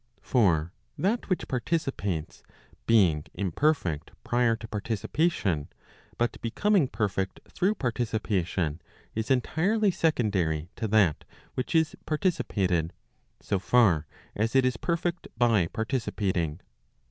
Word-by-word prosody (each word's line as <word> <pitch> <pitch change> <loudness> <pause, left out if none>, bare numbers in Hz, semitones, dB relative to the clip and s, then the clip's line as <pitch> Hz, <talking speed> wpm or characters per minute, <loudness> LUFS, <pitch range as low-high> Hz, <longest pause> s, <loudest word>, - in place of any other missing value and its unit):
For 90 -8 +2 0.2
that 215 +5 0
which 185 - 0
participates, 125 - -2 0.5
being 90 -10 +4
imperfect 95 - 0
prior 120 -1 +2
to 110 0 -9
participation, 105 - -1 0.5
but 120 0 -1
becoming 185 - +2
perfect 100 -4 -2
through 200 +4 0
participation, 105 - -1 0.3
is 110 +3 -3
entirely 190 - +2
secondary 95 - 0
to 110 - -1
that 100 -7 +3 0.3
which 130 +6 -3
is 160 -1 +3
participated, 95 - 0 0.5
so 100 - -1
far 95 -9 +3 0.3
as 115 +4 0
it 135 -1 +5
is 130 -1 +1
perfect 170 +5 -2
by 115 -7 +3
participating. 100 - -2
110 Hz, 105 wpm, -28 LUFS, 90-140 Hz, 0.5 s, it